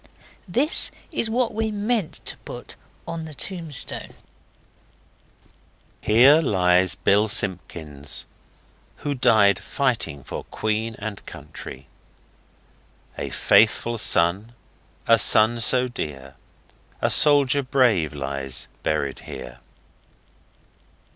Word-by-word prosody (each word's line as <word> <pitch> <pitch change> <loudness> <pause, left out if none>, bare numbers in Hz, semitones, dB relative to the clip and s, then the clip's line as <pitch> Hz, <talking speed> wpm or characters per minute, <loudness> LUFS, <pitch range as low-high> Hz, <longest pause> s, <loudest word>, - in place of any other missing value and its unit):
This 260 - +1 0.2
is 235 -8 0
what 235 0 0
we 220 +1 -1
meant 210 -3 -2
to - - -3
put - - -9 0.3
on 165 -1 -5
the 155 -2 -10
tombstone: 165 -6 -3 1.9
'Here 130 +9 +5
lies 90 - +2
BILL 105 +2 +2
SIMPKINS 85 -8 -2 0.8
Who 145 - 0
died 110 -6 +3
fighting 120 - -2
for - - -7
Queen 110 +1 -3
and 105 -1 -7
Country.' 65 +1 -9 1.3
'A - - -4
faithful 115 +2 +2
son, 95 +6 +2 0.5
A 115 -1 +5
son 110 +3 +5
so 125 +2 +4
dear, 70 - -7 0.7
A - - +1
soldier 145 -2 +4
brave 125 - +1
Lies 70 -2 -3
buried 75 -3 -2
here. 60 0 -10
110 Hz, 95 wpm, -23 LUFS, 85-145 Hz, 1.9 s, Here